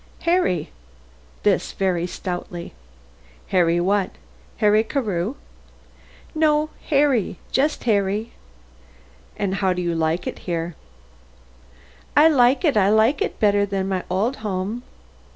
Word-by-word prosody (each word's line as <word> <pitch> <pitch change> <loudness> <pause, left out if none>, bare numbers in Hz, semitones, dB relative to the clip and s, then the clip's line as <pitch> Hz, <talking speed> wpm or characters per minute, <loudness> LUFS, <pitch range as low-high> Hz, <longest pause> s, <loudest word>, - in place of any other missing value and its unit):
"Harry," 335 - +1 0.7
this - - +1
very 180 -3 0
stoutly. 175 -1 -6 0.8
"Harry 175 -2 +3
what? 195 +2 +1 0.5
Harry 215 0 +4
Carew?" 220 - -2 1.0
"No, 310 -1 +2 0.2
Harry; 275 - +2
just 295 +3 +1
Harry." 210 0 0 1.1
"And 195 -2 -1
how 190 -1 +2
do 180 - -3
you 170 -1 0
like 165 +2 0
it - - -5
here?" 170 0 -2 1.4
"I 310 +2 +8
like 265 +1 +4
it; 290 -6 +3
I 200 -2 +4
like 220 +6 +3
it - - -2
better 205 -1 +3
than 195 -1 -2
my 190 -2 -1
old 210 +9 0
home." 210 +2 -3
205 Hz, 115 wpm, -22 LUFS, 180-250 Hz, 1.4 s, I